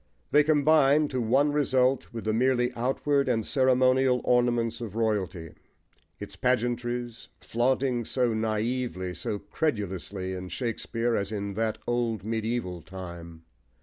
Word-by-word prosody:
They 150 - +6
combine 150 -1 +4
to 130 -2 -2
one 135 +6 +3
result 130 -3 +1
with 115 -1 -6
the 110 - 0
merely 125 +1 +2
outward 135 +3 0
and 115 -3 0
ceremonial 130 -1 +3
ornaments 120 -1 +1
of 110 -3 -6
royalty, 95 -8 -1 0.7
its - - -8
pageantries, 120 -1 -1
flaunting 125 +1 0
so 125 -1 0
naively, 110 -3 -2
so 105 - -3
credulously, 100 - -3
in 90 0 -6
Shakespeare, 115 +3 -2
as 100 +1 -2
in 100 -1 -3
that 110 +1 -1
old 120 -5 -1
medieval 110 -5 -2
time. 85 -2 -9
120 Hz, 125 wpm, -27 LUFS, 105-130 Hz, 0.7 s, They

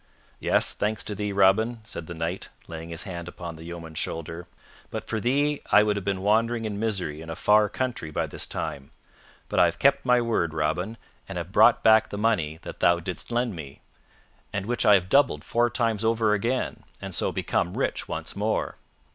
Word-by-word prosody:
"Yes, - - +2
thanks 105 -1 -1
to 105 - -4
thee, 105 0 -3
Robin," 105 +4 +3
said 85 -6 -7
the 85 - -6
Knight, 85 +3 -3 0.2
laying 80 0 -7
his 85 -1 -3
hand 85 -3 -6
upon 85 -1 -7
the 80 +1 -11
yeoman's 85 -2 -7
shoulder. 85 +1 -4 0.4
"But - - -5
for 110 - -1
thee 145 +5 +1
I 105 - +7
would 105 -1 +1
have 100 - -3
been 95 -1 -2
wandering 115 +2 +2
in 105 -2 -3
misery 95 -9 -2
in 80 - -9
a 80 - -4
far 105 +4 +4
country 125 -8 -3
by 75 - -1
this - - -4
time. 70 -1 -4 0.6
But - - 0
I - - +7
have 85 - -1
kept 140 0 +3
my 125 -1 +4
word, 110 -9 0
Robin, 90 +8 -1 0.3
and - - -5
have - - -5
brought - - +5
back 110 0 +6
the 100 - -5
money 100 -8 +1
that - - -8
thou 85 0 +4
didst 85 +6 -5
lend 120 -3 0
me, 70 -4 -9 0.7
and 100 -1 -3
which 120 +2 0
I 105 - +8
have 90 -2 +1
doubled 115 - +3
four 120 +1 +2
times 115 -3 0
over 110 -1 +2
again, 115 +5 -1 0.2
and - - -7
so - - +1
become 85 +2 -1
rich - - -1
once - - -4
more. - - -1
100 Hz, 205 wpm, -26 LUFS, 85-115 Hz, 0.7 s, I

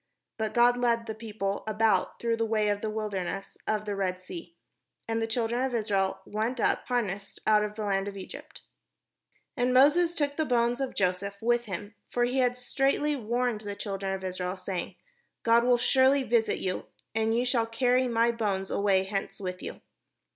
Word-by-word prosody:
But 220 +1 -2
God 240 +1 +5
led 235 -1 +1
the 220 - -4
people 210 -3 -3
about, 220 0 +2
through 230 -1 0
the 230 - +1
way 215 -1 +2
of 205 0 0
the 220 - -2
wilderness 195 -3 -3
of 215 -1 0
the 205 -1 -2
Red 185 -2 -1
Sea; 175 -2 -9 0.5
and 225 0 0
the 225 - 0
children 235 +1 0
of 260 -2 0
Israel 195 -3 0
went 225 +4 -2
up - - +1
harnessed 205 -5 -2
out 210 -1 +5
of 210 0 -4
the 215 - -4
land 195 -1 0
of 200 -1 -6
Egypt. 190 - -9 0.9
And 250 -2 +1
Moses 330 +6 +5
took 285 -2 0
the 315 - +2
bones 245 -2 +1
of 265 - -3
Joseph 195 +2 -1
with 240 +2 +1
him; 205 +1 -6 0.2
for 240 - +1
he 250 +2 +1
had 250 -1 +2
straitly 275 +4 +1
sworn 240 -2 -1
the 205 -1 -6
children 195 -2 -3
of 190 0 -3
Israel, 185 0 -3
saying, 185 -1 -4 0.5
"God 230 0 +5
will 245 -1 +5
surely 265 +2 +4
visit 235 -2 +2
you; 185 -1 -3 0.3
and 225 0 +1
ye 245 - +1
shall 240 -2 +1
carry 250 +3 +2
up - - -1
my 230 +1 +3
bones 200 -4 -2
away 195 -2 +3
hence 195 0 -4
with 180 -2 -5
you." - - -7
220 Hz, 190 wpm, -28 LUFS, 200-245 Hz, 0.9 s, God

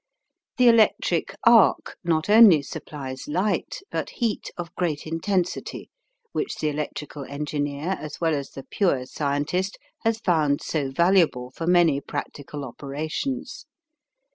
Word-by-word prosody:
The 250 -1 +5
electric 220 -5 +3
arc 230 -3 +5
not 160 -2 +1
only 205 -8 +7
supplies 135 -2 -7
light, 185 - -1
but - - -2
heat 230 -4 -2
of 175 -1 -6
great 160 -5 -2
intensity 175 +3 -2 0.4
which 400 - -2
the 155 - -1
electrical 150 -1 -5
engineer 145 +2 -3
as 150 0 -7
well 165 -2 +1
as 140 -2 -3
the 135 - -9
pure 140 -10 0
scientist 145 +8 -2 0.2
has 225 0 0
found 155 -8 +2
so 145 -4 -1
valuable 165 -5 +2
for 165 +5 -5
many 170 -5 +4
practical 145 0 -6
operations. 155 - -5
160 Hz, 125 wpm, -24 LUFS, 145-190 Hz, 0.4 s, only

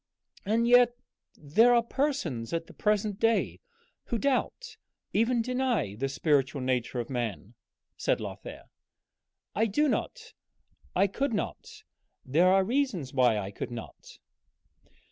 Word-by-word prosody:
"And 230 +3 +2
yet 245 0 +6 0.4
there 225 +12 +4
are 235 - +4
persons 260 - -2
at 165 0 -1
the - - -15
present 210 -1 0
day 225 0 +1 0.5
who 235 - -2
doubt 280 - -1 0.4
even 230 +1 +2
deny 250 - 0
the 135 +6 -3
spiritual 140 -1 +1
nature 125 -1 -1
of 120 - -3
man," 120 -4 -4 0.4
said - - 0
Lothair. - - -8 0.9
"I 220 +3 +2
do 295 +9 +2
not, 455 - -3 0.6
I 190 - +4
could 230 +5 -1
not - - -5 0.4
there 160 +8 +3
are 190 +1 +5
reasons 220 - -1
why 125 -4 +3
I 100 -1 -4
could - - -5
not." 120 -2 -10
205 Hz, 130 wpm, -28 LUFS, -, 0.9 s, yet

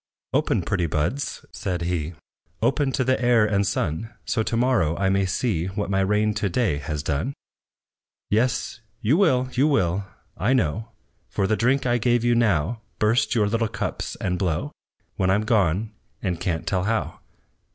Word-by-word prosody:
"Open, - - +1
pretty 85 -2 0
buds," 80 - -2
said 90 -4 -3
he, 85 -1 -2 0.4
"Open 135 +4 +1
to 130 - 0
the 130 0 +1
air 120 -3 +5
and 100 -2 +1
sun; 80 +9 -1 0.2
So, 115 - 0
to 115 +1 -1
morrow 115 -11 +2
I 95 -1 +1
may 95 0 +2
see 95 -3 0
What 100 +1 -3
my 95 - +2
rain 105 +2 +2
to 100 - -1
day 95 - +1
has 75 -1 -4
done. 80 - -1 0.9
"Yes, 120 +1 0 0.2
you 120 +8 +3
will, 135 -9 +3
you 135 +4 +3
will, 95 - +1 0.3
I 115 +7 +1
know, 110 - 0 0.4
For 100 - 0
the 110 +3 +2
drink 130 +4 +2
I 120 -1 +2
give 120 0 +2
you 120 0 +3
now, 110 -2 +1 0.2
Burst 110 +1 +2
your 110 -3 +3
little 115 +2 +1
cups, - - -4
and 90 -2 -2
blow, 85 -5 -1 0.5
When 95 - +1
I'm 100 +3 +3
gone, 105 -1 +1 0.3
and 90 -4 -2
can't 80 -3 -1
tell 90 -1 0
how! 110 +1 -1
105 Hz, 170 wpm, -24 LUFS, 90-120 Hz, 0.9 s, air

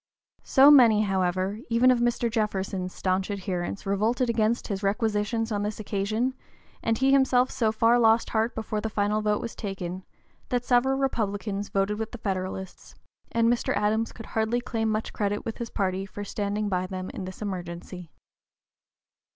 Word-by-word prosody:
So 275 +1 +6
many, 235 -7 +7
however, 190 +1 0
even 240 +2 +5
of 250 - +2
Mr. 240 0 +1
Jefferson's 195 -4 -2
stanch 185 +1 -1
adherents 195 -1 -3
revolted 225 +5 +1
against 225 +1 0
his 200 -2 -3
requisitions 220 +2 0
on 205 -1 0
this 210 +1 -3
occasion, 215 +5 -1 0.5
and 225 0 0
he 265 +2 +3
himself 260 -2 +4
so 220 -3 +1
far 230 +2 +3
lost 225 0 +3
heart 225 +1 0
before 215 -1 -3
the 220 - -2
final 210 0 0
vote 210 -1 +1
was 230 - -5
taken, 185 -2 -5 0.5
that 245 -1 -1
several 265 +2 +3
Republicans 205 -6 -2
voted 200 +2 0
with 220 +2 -4
the - - -5
Federalists, 190 -2 -5 0.4
and 230 0 +2
Mr. 240 0 +1
Adams 220 +2 +1
could 225 - -10
hardly 220 +2 0
claim 225 -2 -2
much 215 0 -2
credit 205 0 -2
with 225 - -5
his 235 -1 -4
party 190 -1 -2
for 205 +2 -7
standing 205 +1 -2
by 185 -2 -1
them 185 -1 -5
in 190 - -6
this 185 0 -8
emergency. 180 -2 -6
215 Hz, 165 wpm, -26 LUFS, 195-230 Hz, 0.5 s, many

